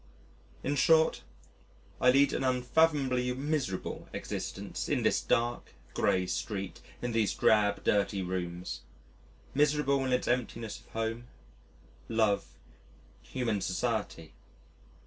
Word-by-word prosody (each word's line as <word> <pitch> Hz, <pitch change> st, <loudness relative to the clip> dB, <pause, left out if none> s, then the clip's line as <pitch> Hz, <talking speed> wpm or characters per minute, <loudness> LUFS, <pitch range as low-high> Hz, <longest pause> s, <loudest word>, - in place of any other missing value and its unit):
In 145 Hz, -, 0 dB
short, 160 Hz, +3 st, +4 dB, 0.8 s
I 125 Hz, -, +6 dB
lead 140 Hz, +2 st, +5 dB
an -, -, -1 dB
unfathomably 130 Hz, 0 st, +2 dB
miserable 135 Hz, -8 st, -3 dB
existence -, -, -4 dB
in -, -, +1 dB
this -, -, +2 dB
dark, 120 Hz, +1 st, 0 dB, 0.2 s
gray 95 Hz, 0 st, +2 dB
street, 95 Hz, +1 st, -4 dB, 0.2 s
in 120 Hz, -, -1 dB
these 115 Hz, -2 st, +1 dB
drab, 105 Hz, -2 st, +3 dB
dirty 100 Hz, -1 st, +1 dB
rooms 90 Hz, -1 st, -4 dB, 0.7 s
miserable 145 Hz, -1 st, +2 dB
in 130 Hz, -, -1 dB
its 125 Hz, -, +1 dB
emptiness 115 Hz, -2 st, -2 dB
of -, -, -22 dB
home, 115 Hz, +2 st, -3 dB, 0.8 s
love, 110 Hz, -3 st, +2 dB, 0.7 s
human 115 Hz, -6 st, -2 dB
society. 100 Hz, -, -2 dB
120 Hz, 110 wpm, -30 LUFS, 100-135 Hz, 0.8 s, I